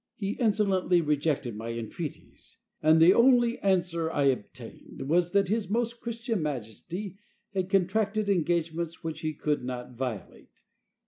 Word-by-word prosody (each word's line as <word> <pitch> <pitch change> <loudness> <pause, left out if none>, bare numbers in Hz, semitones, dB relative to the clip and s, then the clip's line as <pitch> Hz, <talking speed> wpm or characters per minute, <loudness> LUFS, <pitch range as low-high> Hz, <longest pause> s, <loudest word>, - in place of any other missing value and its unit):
He 200 -1 -3
insolently 200 -6 +2
rejected 145 -6 0
my 115 +2 -5
entreaties; 115 +7 -8 0.2
and 155 +1 +5
the 170 +3 +8
only 240 0 +4
answer 175 -4 +1
I 145 -3 0
obtained 130 -6 -3
was 170 +3 +2
that 200 -1 +3
his 215 -2 -1
most 235 +2 -1
Christian 230 -3 -3
majesty 155 - -5 0.3
had 190 -1 -1
contracted 200 +3 +1
engagements 170 -2 -1
which 160 -1 -4
he 155 -1 -2
could 150 -2 -1
not 125 0 -6
violate. 120 -7 -7
170 Hz, 135 wpm, -28 LUFS, 150-200 Hz, 0.3 s, the